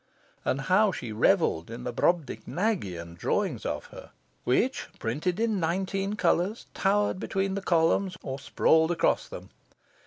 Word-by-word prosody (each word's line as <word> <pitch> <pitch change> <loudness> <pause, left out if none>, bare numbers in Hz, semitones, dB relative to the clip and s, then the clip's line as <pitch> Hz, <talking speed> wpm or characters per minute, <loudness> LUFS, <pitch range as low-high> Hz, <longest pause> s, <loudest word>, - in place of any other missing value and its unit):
And 135 - 0
how 195 +8 +4
she 120 -9 -6
revelled 110 - +2
in 115 +2 -7
the 125 -1 -4
Brobdingnagian 125 - -1
drawings - - -1
of - - -3
her, - - -10 0.4
which, - - +1
printed 160 - -2
in 225 -3 +1
nineteen 195 +4 -1
colours, 185 +3 +1
towered 205 -1 +1
between 195 0 -1
the 200 - -2
columns 180 +2 +2
or 135 +1 -4
sprawled 160 +3 +3
across 175 - +1
them! - - -9
175 Hz, 135 wpm, -28 LUFS, 135-195 Hz, 0.4 s, how